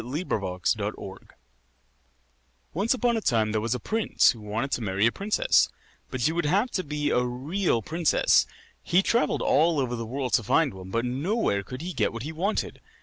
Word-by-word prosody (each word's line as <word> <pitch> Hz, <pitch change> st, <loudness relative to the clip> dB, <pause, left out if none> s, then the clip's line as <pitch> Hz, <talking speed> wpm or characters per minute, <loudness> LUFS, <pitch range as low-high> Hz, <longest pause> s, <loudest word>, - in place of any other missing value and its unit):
THE 140 Hz, +9 st, -4 dB
PRINCESS 90 Hz, -, -1 dB
AND 105 Hz, +1 st, -2 dB
THE 95 Hz, -1 st, -8 dB
PEA -, -, -24 dB, 1.4 s
Once 205 Hz, -, +1 dB
upon 240 Hz, -2 st, +1 dB
a -, -, -2 dB
time 110 Hz, -, +1 dB
there 110 Hz, 0 st, 0 dB
was 115 Hz, +3 st, -1 dB
a -, -, -4 dB
prince 220 Hz, -, +2 dB
who 115 Hz, -, -10 dB
wanted 110 Hz, +6 st, -3 dB
to -, -, -1 dB
marry 100 Hz, 0 st, 0 dB
a 115 Hz, -, +4 dB
princess; 215 Hz, -, +2 dB, 0.4 s
but 130 Hz, -, -4 dB
she 150 Hz, -, +2 dB
would 170 Hz, -2 st, -1 dB
have 205 Hz, +10 st, +1 dB
to 185 Hz, -, -1 dB
be 150 Hz, -1 st, -2 dB
a 125 Hz, -, +2 dB
real 130 Hz, -, -1 dB
princess. 165 Hz, +3 st, +2 dB, 0.3 s
He 180 Hz, +3 st, +2 dB
travelled 235 Hz, +4 st, +1 dB
all 160 Hz, 0 st, +3 dB
over 125 Hz, -2 st, -1 dB
the 115 Hz, -1 st, -5 dB
world 130 Hz, +1 st, -3 dB
to 120 Hz, -, +3 dB
find 155 Hz, +6 st, +2 dB
one, 95 Hz, -1 st, -10 dB
but 115 Hz, +5 st, -1 dB
nowhere 135 Hz, -, 0 dB
could 130 Hz, +8 st, -8 dB
he 180 Hz, +1 st, -4 dB
get -, -, 0 dB
what 115 Hz, 0 st, -6 dB
he 155 Hz, -, -5 dB
wanted. 185 Hz, +7 st, -2 dB
135 Hz, 205 wpm, -26 LUFS, 115-175 Hz, 1.4 s, a